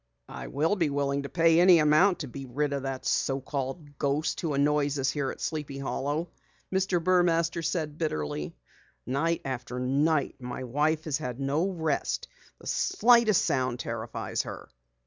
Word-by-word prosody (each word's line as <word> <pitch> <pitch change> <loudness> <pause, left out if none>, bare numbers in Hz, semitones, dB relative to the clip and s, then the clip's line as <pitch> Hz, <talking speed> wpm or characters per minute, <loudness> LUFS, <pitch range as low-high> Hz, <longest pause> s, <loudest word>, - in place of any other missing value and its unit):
"I'll 160 +8 -1
be 170 -6 +1
willing 140 0 0
to 140 - -6
pay 165 -1 +4
any 180 0 +7
amount 160 +5 +4
to 145 - -4
be 135 +2 -8
rid 145 +3 -1
of 140 - -2
that 135 -1 -4
so 135 0 +1
called 140 +2 -5
ghost 145 +2 0
who 155 -4 -1
annoys 145 0 +2
us 135 -1 +1
here 140 -3 -2
at - - -7
Sleepy 150 -3 -4
Hollow," 145 +4 -2 0.5
Mr. 190 -1 +2
Burmaster 170 -1 +2
said 155 -2 -2
bitterly. 75 - -3 0.5
"Night 160 +6 0
after 125 -1 -4
night 140 +4 +1
my 125 +1 -5
wife 150 +5 0
has 150 -3 -1
had 125 0 -5
no 145 +7 0
rest. 160 -6 -1 0.3
The - - -16
slightest 235 - +4
sound 130 -2 0
terrifies 115 -2 -3
her." - - -8
145 Hz, 160 wpm, -28 LUFS, 135-165 Hz, 0.5 s, any